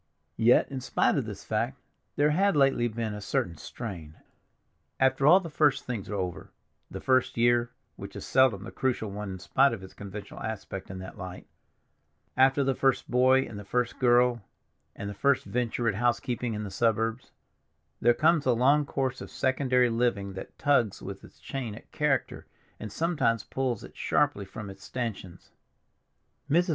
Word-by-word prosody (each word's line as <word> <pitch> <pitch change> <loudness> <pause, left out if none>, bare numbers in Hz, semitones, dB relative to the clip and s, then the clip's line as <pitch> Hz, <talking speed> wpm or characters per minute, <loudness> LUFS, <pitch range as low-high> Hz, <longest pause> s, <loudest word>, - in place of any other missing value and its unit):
Yet, 120 +4 +4
in 135 -2 -4
spite - - +1
of - - 0
this - - -7
fact, - - -2 0.4
there 150 +1 +3
had 195 +4 +2
lately 135 -4 +3
been 110 -1 -3
a 105 - -6
certain 90 -3 -1
strain. 85 -6 -8 0.8
After 130 +1 +3
all 180 +5 +8
the 185 - -7
first 145 -3 +2
things 115 -6 -4
are 105 - -3
over—the 90 -3 -7
first 130 -1 +1
year, 120 0 +3 0.3
which - - -9
is - - -6
seldom 125 -7 +3
the - - -8
crucial 120 -5 -1
one 105 0 -5
in - - -6
spite 135 +8 +3
of 100 -4 -6
its 95 - -11
conventional 100 +1 -9
aspect 100 -3 -5
in 95 - -6
that 95 +3 -9
light; 95 -1 -7 0.9
after 135 +2 +4
the 135 0 +1
first 135 0 0
boy, 130 +1 +5
and 105 - -8
the - - -8
first 125 +4 -1
girl, 120 -1 +4 0.5
and 100 - -6
the 100 - -4
first 140 +6 +2
venture 120 -1 -1
at 110 - +2
housekeeping 120 +1 -1
in 105 - -4
the 100 - -6
suburbs—there 115 +2 -2
comes 155 -1 +3
a 125 - +5
long 140 +5 +3
course 130 -3 -2
of - - -8
secondary 130 -2 +2
living 115 -5 0
that 95 - -9
tugs 130 -8 +1
with - - -7
its - - -16
chain 125 -6 -5
at - - -14
character 150 -3 -1 0.3
and 110 - -7
sometimes 155 - 0
pulls 130 -4 -2
it - - -12
sharply 100 - +1
from 105 +2 -8
its 95 0 -11
stanchions. 105 -8 -6 1.0
Mrs. 175 +5 +3
120 Hz, 175 wpm, -28 LUFS, 105-130 Hz, 1.0 s, all